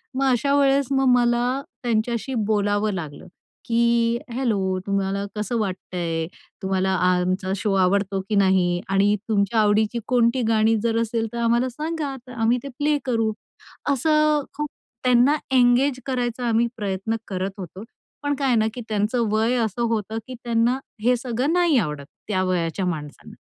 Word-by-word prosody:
मग 270 - 0
अशा 270 +3 +1
वेळेस 275 -1 +3
मग 270 0 +2
मला 245 +2 +1 0.2
त्यांच्याशी 235 +1 -1
बोलावं 205 0 +1
लागलं, 160 -3 -7 0.4
की 235 0 +2 0.2
हॅलो 200 -7 0
तुम्हाला 200 0 -1
कसं 210 +3 -2
वाटतंय. 175 -5 -3 0.4
तुम्हाला 190 0 0 0.2
आमचा 185 +1 0
शो 200 +1 -1
आवडतो 195 +1 +1
की 215 - +1
नाही 190 -3 +3
आणि 200 +2 +3
तुमच्या 205 +1 +2
आवडीची 215 +2 +2
कोणती 245 0 +2
गाणी 220 0 +3
जर 230 -1 +1
असेल, 225 0 -1
तर - - -4
आम्हाला 235 +2 +2
सांगा, 300 +1 -4
तर - - -10
आम्ही 235 0 +2
ते - - -6
प्ले 295 0 +2
करू. 225 -4 +1 0.6
असं 305 +2 +2
खूप 300 0 -2 0.3
त्यांना 250 +3 +4 0.2
एंगेज 255 +1 +4
करायचा 245 -2 -2
आम्ही 230 +1 +2
प्रयत्न 200 +1 -2
करत 190 0 -3
होतो. 185 +2 -8 0.4
पण 290 0 0
काय 275 0 -1
आहे 250 - +3
ना, 220 0 +2
की 245 - -6
त्यांचं 220 +3 0
वय 220 +3 +2
असं 220 +2 -4
होतं, 220 -1 -2
की 255 - -7
त्यांना 235 +2 +1 0.2
हे 250 +2 +4
सगळं 250 +3 -1
नाही 350 -5 +3
आवडत, 150 -7 -3 0.2
त्या 190 -3 0
वयाच्या 180 0 -1
माणसांना. 150 -5 -6
225 Hz, 155 wpm, -23 LUFS, 195-250 Hz, 0.6 s, त्यांना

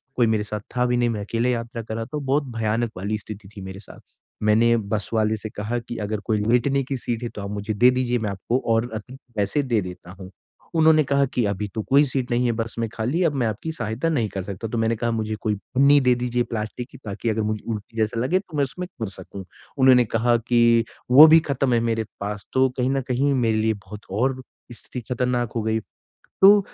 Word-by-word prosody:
कोई 120 -2 +3
मेरे 110 -1 +1
साथ 105 0 -4 0.2
था 125 0 +2
भी 125 0 +1
नहीं 120 0 +2
मैं 110 -3 -2
अकेले 115 +4 0
यात्रा 115 -1 -3
कर 110 0 -6
रहा 115 0 -3
था 135 +6 -5
बहुत 140 +1 +1
भयानक 115 +1 0
वाली 100 +4 -2
स्थिति 105 -1 -10
थी - - -6
मेरे 95 0 -8
साथ। 100 - -16 0.3
मैंने 115 +2 +4
बस 105 -1 -3
वाले 110 0 +2
से 110 +1 -7
कहा 110 +3 -3
कि 120 0 -8
अगर 105 0 -2
कोई 110 -2 +1
लेटने 125 +4 +2
की 135 +1 -3
सीट 120 -1 -3
है 120 - -2
तो 105 - -5
आप 100 - -5
मुझे 105 +1 -3
दे 120 +5 +5
दीजिए 125 -1 0
मैं 110 -2 -2
आपको 100 +6 -1
और 115 +2 +1
अधिक 125 +5 -8 0.2
पैसे 105 +8 +1
दे 120 -5 +1
देता 90 -1 -9
हूँ। 95 -1 -9 0.5
उन्होंने 160 -1 +5
कहा 140 0 +2
कि 125 - +1
अभी 100 0 -2
तो 110 - -1
कोई 140 +2 +6
सीट 130 -2 -3
नहीं 120 +1 +2
है - - +2
बस 115 0 -3
में 115 - 0
खाली, 125 +10 -1
अब 165 -4 +2
मैं 130 -5 0
आपकी 110 +9 -3
सहायता 115 +4 -2
नहीं 130 -9 +1
कर 95 -1 -5
सकता। 100 +3 -5
तो 120 - -3
मैंने 115 +1 +1
कहा 115 +1 -1
मुझे 110 -1 -2
कोई 105 -2 0 0.2
पन्नी 140 +2 +6
दे 125 -1 +4
दीजिए 125 0 0
प्लास्टिक 115 +1 -5
की - - -12
ताकि 105 +3 -3
अगर 110 0 0
मुझे 110 0 -2
उल्टी 110 +1 -6
जैसा 110 +1 0
लगे 170 +10 +2
तो 180 -6 -9
मैं 145 - +3
उसमें 180 +8 -6
कर 110 - -1
सकूँ 100 0 -8 0.4
उन्होंने 130 -2 +6
कहा 115 +2 +2
कि 115 -1 +5 0.3
वो 145 +5 +11
भी 160 +1 +8
ख़त्म 135 -4 0
है 120 - +4
मेरे 115 -1 0 0.2
पास, 105 0 -4
तो 130 0 +4
कहीं 125 0 +1
न 135 0 0
कहीं 135 +3 +1
मेरे 115 -4 +1
लिए 110 0 +2
बहुत 105 -1 -9
और 130 +6 0 0.3
स्थिति 125 +2 -8
खतरनाक 125 -1 0
हो 115 - 0
गई। 110 0 0 0.6
तो 200 +2 +9
115 Hz, 240 wpm, -23 LUFS, 110-130 Hz, 0.6 s, वो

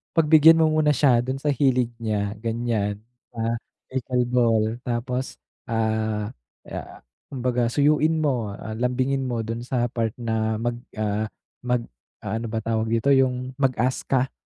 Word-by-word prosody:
pagbigyan 160 0 +7
mo 155 - +3
muna 155 -1 +3
siya 125 -3 +4
dun 130 +2 -3
sa 145 +1 0
hilig 125 -3 +2
niya, 105 -3 -1
ganyan, 115 -3 -1 0.4
sa 115 0 -1 0.3
pickle 125 -1 0
ball. 120 -3 +3 0.2
Tapos 125 +2 -2 0.3
ah, 110 -2 -1 0.4
ah, - - -7 0.3
kumbaga 125 -2 0
suyuin 155 +4 +2
mo, 120 -8 -1
ah, 110 - -7
lambingin 130 +3 0
mo 120 -2 -2
dun 115 +1 -4
sa 120 -2 0
part 115 -2 -1
na 110 -2 -1
mag, 120 +2 -2 0.2
ah, 110 0 -1 0.3
mag, 125 -1 0 0.4
ah, 110 +3 -2
ano 115 - -4
ba 110 0 -3
tawag 110 0 0
dito, 115 +5 +2
yung 130 -1 +2
mag-ask 130 -1 0
ka 130 -1 +1
120 Hz, 150 wpm, -24 LUFS, 110-130 Hz, 0.4 s, pagbigyan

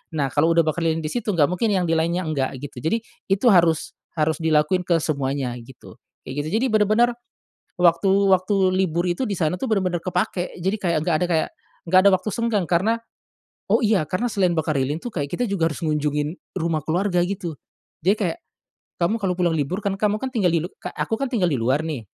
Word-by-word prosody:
Nah, 140 -4 0
kalau 165 +3 +2
udah 165 - +5
bakar 165 +2 -1
lilin 160 0 0
di 155 - -3
situ, 215 -5 -2
nggak 145 -3 +4
mungkin 200 +5 0
yang 185 - +1
di 165 - -1
lainnya 170 +3 0
enggak, 140 -4 -2
gitu. 130 -3 -7
Jadi, 225 - -1 0.2
itu 195 +5 +2
harus 170 -4 +3 0.2
harus 155 0 0
dilakuin 160 +3 +2
ke 170 -2 +3
semuanya, 135 -4 -2
gitu. 130 +1 -14 0.3
Kayak 145 +2 -3
gitu. - - -3
Jadi, 265 - +2
bener-bener, 215 +3 +4 0.7
waktu 175 +2 +4 0.2
waktu 185 +2 +2 0.2
libur 175 -2 +1
itu, 175 +9 -1
di 200 - -2
sana 160 0 +1
tuh 265 - -2
bener-bener 185 -4 +1
kepakai. 180 0 -2
Jadi, 190 +5 0
kayak, 170 -5 +1
nggak 165 -2 +1
ada - - 0
kayak 165 -2 +1 0.4
nggak 185 +2 +6
ada - - +6
waktu 185 +3 +1
senggang, 230 -6 0
karena 200 +7 +1 0.7
oh, - - +5
iya, 210 -7 +3
karena 210 +9 -1
selain 185 -3 +2
bakar 155 -2 0
lilin 145 +4 -1
tuh, 245 - -6
kayak 145 -3 -1
kita 245 - -1
juga 180 -5 +1
harus 155 - -6
ngunjungin 150 0 -1 0.2
rumah 160 -2 -1
keluarga, 180 +3 0
gitu. 180 -4 -4 0.5
Dia 195 +4 +4
kayak, 175 -5 -1 0.6
kamu 195 +7 +2
kalau 190 -2 0
pulang 175 -2 +2
libur, 175 +8 -2
kan 195 - +1
kamu 210 0 +1
kan 265 - -2
tinggal 205 -7 +2
di 165 - +1
lu - - -7
ka - - -4
aku - - -2
kan 275 0 -2
tinggal 195 -7 +2
di 145 - 0
luar 130 +5 +1
nih 140 -8 -4
175 Hz, 215 wpm, -23 LUFS, 155-195 Hz, 0.7 s, nggak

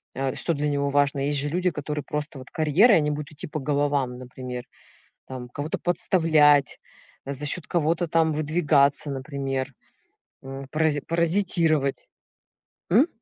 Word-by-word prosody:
а 135 -1 -2
что 170 - -1
для 150 -1 -1
него 140 0 0
важно. 145 0 +1
Есть 145 +1 0
же 145 +1 -2
люди, 180 +3 0
которые 150 -2 -4
просто 150 -1 -5
вот 130 - -12
карьера, 160 - +4
и - - +6
они 150 -1 +1
будут 150 +1 -5
идти 150 - -6
по 155 - -4
головам, 140 -2 0
например, 125 0 -7 0.7
там 125 -2 -7
кого-то 145 +5 -4
подставлять, 155 -5 +3 0.5
за 140 +1 -4
счёт 160 +3 0
кого-то 170 +1 0
там 160 0 +2
выдвигаться, 150 -2 +2
например, 135 -1 -4 0.7
м, 135 0 -8
парази 155 -1 +1
паразитировать. 165 -4 +1 0.8
М? 240 - +5
145 Hz, 145 wpm, -25 LUFS, 140-160 Hz, 0.8 s, и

